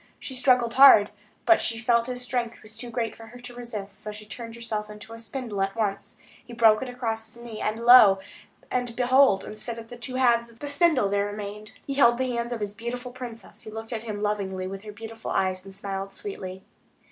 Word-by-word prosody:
She 265 - -7
struggled 250 -2 +3
hard; 260 -6 +8 0.3
but 340 - +5
she 230 - 0
felt 235 +1 +2
his 250 0 -5
strength 245 -2 -3
was 215 0 -10
too 240 +2 -6
great 235 -1 -2
for 225 - -12
her 245 +2 -12
to 245 0 -8
resist; 225 -5 -6
so 210 - -5
she 210 0 -10
turned 230 +3 -8
herself 215 -2 -4
into 210 +1 -10
a 230 - -9
spindle 230 -2 -5
at 195 +1 -1
once. 205 -3 -2 0.3
He 240 -1 -12
broke 225 -2 +5
it 260 - -4
across 225 -3 -3
his 235 +2 -6
knee.... 225 -3 -7
And 215 +1 -1
lo! 235 -5 +8 0.5
and 245 -2 -1
behold! 255 -4 +4
instead 220 +2 -4
of 225 0 -10
the 245 - -9
two 255 +2 -6
halves 235 -2 +3
of 230 - -18
the 290 - -6
spindle 285 - +2 0.7
he 275 - -3
held 240 -4 +5
the 260 0 -1
hands 235 0 -2
of 235 -2 -4
his 205 -1 -3
beautiful 245 +3 -5
princess, 245 -2 -9
who - - -8
looked 225 +2 -7
at 225 - -3
him 215 -2 -5
lovingly 195 -3 -2
with 195 +1 -6
her 210 0 -9
beautiful 225 +2 -8
eyes, 185 -1 0
and 195 -1 -10
smiled 195 0 -5
sweetly. 190 -2 -7
230 Hz, 215 wpm, -26 LUFS, 210-245 Hz, 0.7 s, hard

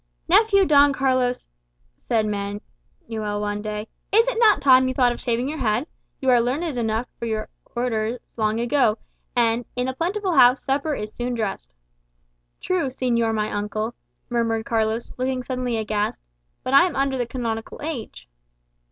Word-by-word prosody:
"Nephew 395 +2 +5
Don 285 -3 +5
Carlos," 255 -2 0 0.6
said 225 -2 +2
Don 205 -1 -3 0.5
Manuel 215 -2 -3
one 205 0 -2
day, 210 0 -4 0.2
"is 450 +4 +5
it - - -1
not 435 -4 +5
time 260 -1 +5
you 260 - -2
thought 250 -2 +4
of 240 - -6
shaving 240 +1 0
your 310 +2 -4
head? 235 +2 +1 0.3
You 265 -2 +2
are 245 -1 +5
learned 255 +7 -1 0.2
enough 225 +1 -1
for 235 - -3
your 220 -1 -3 0.3
Orders 235 -1 -1 0.2
long 220 0 0
ago, 240 -2 +2 0.4
and 235 0 +2
'in 250 0 -1
a 260 - -2
plentiful 370 +6 -1
house 250 -2 +6
supper 280 +2 0
is 210 -3 -5
soon 245 +1 -3
dressed.'" 215 - -4 0.8
"True, 360 -6 0
señor 240 -3 0
my 215 0 -1
uncle," 215 +2 -2 0.3
murmured 230 -2 0
Carlos, 225 0 -1
looking 255 0 -1
suddenly 250 -2 -2
aghast. 210 -1 -1 0.4
"But 255 - -2
I 280 +6 +7
am 335 - -6
under 275 0 +1
the 245 - -1
canonical 230 -3 -4
age." 295 - -6
245 Hz, 165 wpm, -23 LUFS, 220-270 Hz, 0.8 s, I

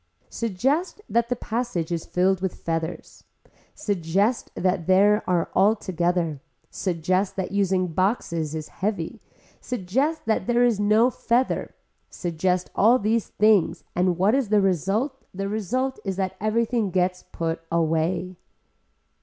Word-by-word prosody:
Suggest 265 - -1
that 235 0 +1
the 245 - +1
passage 230 -8 -3
is 170 -2 -3
filled 185 +1 +1
with 190 -2 -2
feathers, 165 +1 -4 0.5
suggest 200 - 0
that 180 -2 0
there 205 +3 +4
are 175 -2 +1
all 210 +3 +4
together, 170 -6 -1 0.3
suggest 185 +2 -1
that 190 -1 -3
using 190 -2 +1
boxes 170 -3 -1
is 155 -1 -5
heavy, 190 -5 -3 0.4
suggest 250 - -1
that 220 +1 0
there 240 0 +3
is 235 -4 +2
no 215 +4 +4
feather, 245 +2 0 0.3
suggest 180 +1 -1
all 230 +5 +5
these 220 0 0
things 210 -4 +2
and 180 -1 +2
what 195 +4 +3
is 265 -5 +1
result 205 - +1
the 195 +1 -2
result 245 +6 -2
is 195 -2 -2
that 190 0 -2
everything 225 0 +1
gets 180 0 0
put 165 0 -2
away. 170 +2 0
195 Hz, 130 wpm, -24 LUFS, 180-225 Hz, 0.5 s, all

